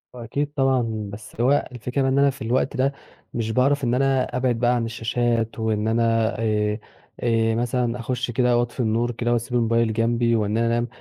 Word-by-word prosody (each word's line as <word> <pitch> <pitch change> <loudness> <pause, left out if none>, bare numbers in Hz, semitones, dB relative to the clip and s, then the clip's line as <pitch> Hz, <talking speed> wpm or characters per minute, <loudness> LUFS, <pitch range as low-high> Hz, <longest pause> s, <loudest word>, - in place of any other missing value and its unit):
هو 120 - -7
أكيد 145 +5 -2
طبعًا، 120 -6 0
بَس 105 +1 -10
اللي 120 - -2
هو 140 +3 +3
الفكرة 125 +3 -3
إن 130 - +1
أنا 140 0 +5
في 135 - -7
الوقت 130 +5 0
ده 135 +2 +1 0.4
مش 115 -1 -2
باعرف 140 +4 +2
إن 120 -1 +1
أنا 130 -1 +1
أبعد 125 -2 0
بقى 120 +1 +3
عن 115 -1 0
الشاشات 115 0 -1
وإن 110 -1 0
أنا 115 0 +2
آآ 105 -1 0 0.4
آآ، 115 -1 +1
مثلًا 120 0 -1
أخُش 125 +1 -2
كده 125 0 +2
وأطفي 120 +2 -2
النور 120 +1 +1
كده 120 +1 -1
وأسيب 120 +1 -2
الموبيل 115 -1 +2
جنبي 115 +1 +1
وإن 105 0 0
أنا 115 0 +2
أنام، 120 +1 +1
120 Hz, 195 wpm, -23 LUFS, 115-125 Hz, 0.4 s, أنا